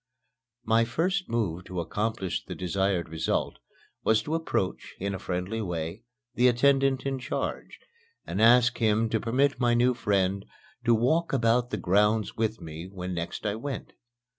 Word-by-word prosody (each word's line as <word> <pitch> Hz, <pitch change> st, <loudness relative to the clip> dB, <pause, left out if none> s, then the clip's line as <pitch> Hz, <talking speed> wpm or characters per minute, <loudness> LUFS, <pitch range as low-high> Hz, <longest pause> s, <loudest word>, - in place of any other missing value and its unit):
My 115 Hz, +1 st, +4 dB
first 180 Hz, +10 st, -1 dB
move 95 Hz, -7 st, -1 dB
to 90 Hz, -1 st, -5 dB
accomplish 105 Hz, +2 st, -2 dB
the -, -, -7 dB
desired 95 Hz, 0 st, 0 dB
result 80 Hz, 0 st, -1 dB, 0.4 s
was 110 Hz, 0 st, +3 dB
to 150 Hz, -, -4 dB
approach, 160 Hz, -, -2 dB
in 100 Hz, +1 st, -2 dB
a 95 Hz, -, -4 dB
friendly 90 Hz, +5 st, -3 dB
way, 85 Hz, 0 st, -4 dB, 0.3 s
the 125 Hz, -, +4 dB
attendant 135 Hz, +2 st, +3 dB
in 135 Hz, -1 st, -1 dB
charge, 130 Hz, +3 st, -4 dB, 0.5 s
and 100 Hz, -, -2 dB
ask 120 Hz, +1 st, +5 dB
him 110 Hz, 0 st, +2 dB
to 110 Hz, -, +1 dB
permit 130 Hz, +5 st, +1 dB
my 120 Hz, -2 st, +3 dB
new 125 Hz, +1 st, +4 dB
friend 100 Hz, -4 st, 0 dB, 0.4 s
to 120 Hz, -1 st, +5 dB
walk 155 Hz, +10 st, +1 dB
about 120 Hz, -1 st, +2 dB
the -, -, -2 dB
grounds 105 Hz, +3 st, +2 dB
with 110 Hz, 0 st, -1 dB
me 80 Hz, 0 st, -8 dB
when 90 Hz, -1 st, -5 dB
next 85 Hz, +4 st, -4 dB
I 105 Hz, -, +1 dB
went. 135 Hz, +5 st, -5 dB
110 Hz, 160 wpm, -27 LUFS, 95-125 Hz, 0.5 s, ask